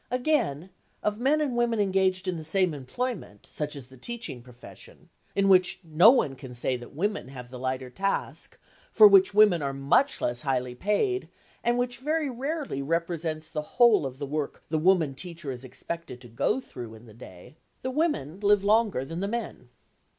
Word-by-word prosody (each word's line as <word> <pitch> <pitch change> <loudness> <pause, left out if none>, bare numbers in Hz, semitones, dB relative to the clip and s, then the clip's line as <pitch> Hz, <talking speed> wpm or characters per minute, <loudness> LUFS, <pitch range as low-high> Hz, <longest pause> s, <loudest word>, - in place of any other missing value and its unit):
Again, 245 - 0 0.3
of 210 0 -1
men 285 +5 +2
and 275 -5 -1
women 240 -2 +1
engaged 190 -1 +1
in 185 - 0
the 160 - -6
same 180 +2 +1
employment, 145 - -5
such 150 0 -5
as 140 -4 -8
the 130 +1 -17
teaching 235 - -6
profession—in 125 +9 -7
which 185 -1 +4
no 170 +6 +6
one 235 - +3
can 130 -1 -10
say 125 +1 -1
that 120 +2 -10
women 205 -2 -2
have 125 -2 -10
the 125 - -8
lighter 130 0 -3
task, 195 +7 -3 0.3
for 215 -2 +9
which 195 0 +5
women 205 -6 +6
are 140 -1 -2
much 140 - +2
less 120 0 -1
highly 125 -3 -1
paid, 210 - 0 0.3
and 240 +1 +2
which 245 -1 -2
very 300 +1 -1
rarely 275 - -3
represents 165 0 -2
the 155 -1 -4
whole 220 - +4
of 130 0 -9
the 140 - -4
work 145 0 -4
the 155 0 0
woman 165 -4 +3
teacher 170 -1 -7
is 125 0 -7
expected 130 +2 -7
to 120 - -12
get 120 - -1
through 115 -3 -9
in 110 +2 -15
the 110 - -15
day—the 125 - -10
women 260 - -1
live 205 -1 +3
longer 210 - +2
than 165 +4 -6
the 200 - -1
men. 215 - -5
170 Hz, 180 wpm, -27 LUFS, 135-220 Hz, 0.3 s, for